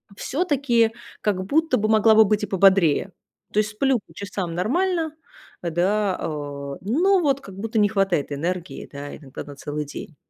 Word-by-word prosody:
всё-таки, 260 - +1 0.3
как 190 -3 0
будто 310 +2 +2
бы 215 +1 0
могла 220 0 +5
бы 220 - +8
быть 210 +1 +1
и - - -1
пободрее. 190 -2 +3 0.4
То 210 - +1
есть 210 0 0
сплю 260 +2 +1
по 165 - -20
часам 190 -2 -4
нормально, 325 - 0 0.5
э, 170 - -2
да, 195 +3 +1
а, - - -3 0.5
но 350 - +3
вот 275 -3 +2
как 195 -1 -11
будто 220 +2 -2
не 205 - +5
хватает 195 -8 0
энергии, 175 +5 -4
да, 145 0 -7
иногда 135 -4 -9
на 145 -1 -10
целый 150 +1 -4
день. 145 +2 -9
205 Hz, 175 wpm, -23 LUFS, 180-240 Hz, 0.5 s, бы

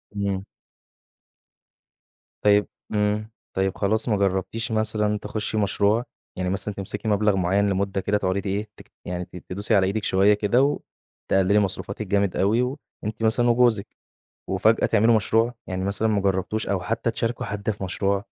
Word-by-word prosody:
إمم. 100 -2 -1 2.0
طيب 105 0 +4 0.3
إمم. 105 +1 0 0.2
طيب 95 0 0
خلاص، 110 +4 +1
ما 105 - +2
جربتيش 100 +4 -1
مثلًا 105 -1 +1
تخشّي 110 +1 -3
مشروع؟ 105 +2 +2 0.3
يعني 90 0 -1
مثلًا 100 +2 -1
تمسكي 100 +2 -5
مبلغ 105 -1 +3
معيّن 95 +3 +2
لمدة 100 0 -1
كده 105 +2 +1
تقعدي 95 0 -1
تإيه 100 +2 -3 0.4
يعني 90 0 -4
ت 90 - -17
تدوسي 100 +4 0
على 95 -1 +4
إيدِك 105 +2 -2
شوية 95 +2 +4
كده 120 +8 +2 0.5
وتقللي 95 +2 +4
مصروفاتِك 100 +1 -2
جامد 100 -1 +1
أوي 105 +5 +3
و 130 +3 -2 0.3
أنتِ 110 +1 -4
مثلًا 120 +2 +3
وجوزِك 120 -4 +2 0.5
وفجأة - - +3
تعملوا 115 +1 +4
مشروع؟ 115 +3 +2
يعني 95 0 -3
مثلًا 100 +3 0
ما 105 -2 +2
جربتوش 95 +3 -1
أو 100 -2 0
حتى 115 +5 -1
تشاركوا 115 +1 -2
حد 105 +1 -3
في 100 -2 -4
مشروع. 100 +2 0
100 Hz, 155 wpm, -24 LUFS, 95-110 Hz, 2.0 s, طيب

